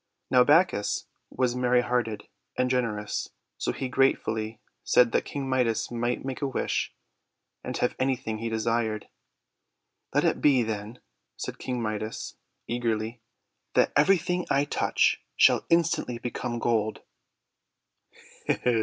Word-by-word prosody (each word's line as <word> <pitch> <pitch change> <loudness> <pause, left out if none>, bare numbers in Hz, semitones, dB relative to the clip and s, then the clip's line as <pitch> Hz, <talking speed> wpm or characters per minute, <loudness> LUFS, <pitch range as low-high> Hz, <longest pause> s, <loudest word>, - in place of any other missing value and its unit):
Now 125 -1 +7
Bacchus 150 - +3 0.2
was 125 -1 0
merry 125 0 +3
hearted 120 -4 -1 0.3
and 125 0 +1
gener 115 -5 0
ous, 105 - -4 0.3
so - - 0
he 130 - -4
gratefully 115 -4 +1 0.2
said 120 -2 +4
that - - +1
King 140 -2 -4
Midas 125 -4 +1
might 120 +2 -2
make 135 +1 -4
a 140 - +1
wish, 135 - -2 0.7
and - - -4
have 125 - +1
anything 125 -4 -1
he 115 +1 -2
desired. 110 -1 -1 1.0
"Let - - +2
it - - +1
be, 135 -4 +5
then," 110 +1 -5 0.4
said - - -6
King 125 -2 -3
Midas 110 0 -4 0.3
eagerly, 115 -1 -2 0.5
"that - - +3
everything 180 +3 +3
I 140 +1 +3
touch - - +1 0.2
shall - - +5
instantly 165 -7 +2
become 120 0 -4
gold." 110 -3 0
120 Hz, 130 wpm, -27 LUFS, 110-130 Hz, 1.0 s, Now